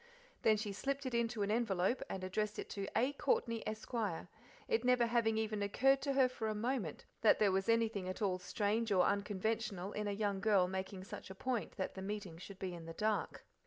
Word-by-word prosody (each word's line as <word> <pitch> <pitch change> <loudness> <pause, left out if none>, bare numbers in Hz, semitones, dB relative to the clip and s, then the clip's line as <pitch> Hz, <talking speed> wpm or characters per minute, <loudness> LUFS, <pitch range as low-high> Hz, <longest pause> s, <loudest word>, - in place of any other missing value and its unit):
Then 215 -1 +5
she 210 -1 -3
slipped 275 +6 -2
it 255 - -2
into 235 -2 +1
an 200 - 0
envelope 220 0 +1
and 190 - -4
addressed 210 +3 -1
it - - -5
to 200 -1 -3
A. 255 +5 +2
Courtney, 230 -5 +1
Esq., 215 +3 -5 0.7
it 225 +1 +1
never 250 -1 +4
having 230 -2 +2
even 215 -1 -1
occurred 270 +7 +3
to 275 0 0
her 265 -1 +5
for 245 -3 -4
a 215 - -1
moment 220 - -2 0.2
that 220 - +6
there 205 -2 +4
was 195 +3 0
anything 225 -5 +2
at 185 - -4
all 190 -4 +1
strange 210 +4 0
or 185 -2 +5
unconventional 205 -1 -1
in 210 0 -3
a - - 0
young 200 -1 0
girl 195 -3 +4
making 190 0 -4
such 205 -1 -8
a 190 - -8
point 240 -3 -2
that 190 - -2
the 190 - -7
meeting 195 -4 -5
should 195 +1 -9
be 185 -2 -4
in 170 -1 -8
the 165 - -6
dark. 215 -1 -1
210 Hz, 215 wpm, -36 LUFS, 195-230 Hz, 0.7 s, that